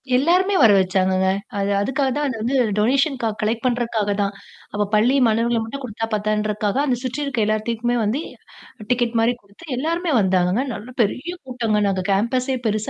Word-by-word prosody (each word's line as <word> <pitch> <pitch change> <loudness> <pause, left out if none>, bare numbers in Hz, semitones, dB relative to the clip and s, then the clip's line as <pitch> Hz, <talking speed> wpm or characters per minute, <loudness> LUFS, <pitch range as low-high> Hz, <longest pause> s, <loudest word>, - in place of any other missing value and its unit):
எல்லாருமே 360 +9 +3
வர 225 -4 +7
வச்சாங்கங்க. 185 0 +1 0.3
அது 200 0 0
அதுக்காக 265 +6 0
தான் 295 0 0
அந்த 255 -4 -3
வந்து 245 +5 -1 0.2
டொனேஷன்கா 260 +3 +1
க - - -17
கலெக்ட் 225 +2 -1
பண்றக்காக 235 -4 0
தான். 200 0 -1 0.4
அப்போ 205 0 0
பள்ளி 235 +6 +3
மாணவர்கள 230 +1 +1
மட்டும் 275 +5 -7
கொடுத்தா 225 -2 -4
பத்தாதுன்றதுக்காக 210 0 -1
அந்த 260 -4 +1
சுற்றி 260 +3 -3
இருக்கிற 260 -6 -1
எல்லாத்துக்குமே 230 +2 -1
வந்து 230 +8 0 0.7
டிக்கெட் 240 -1 +1
மாரி 230 +2 +3
குடுத்து 200 +10 -17
எல்லோருமே 330 +4 -1
வந்தாங்கங்க. 185 +4 +2
நல்ல 215 +4 -8
பெரிய 255 - -1
கூட்டங்க 230 -5 -1
நாங்க 190 -1 -1
கேம்பஸே 255 +6 +1
பெருசு 215 0 -1
230 Hz, 165 wpm, -21 LUFS, 210-260 Hz, 0.7 s, வர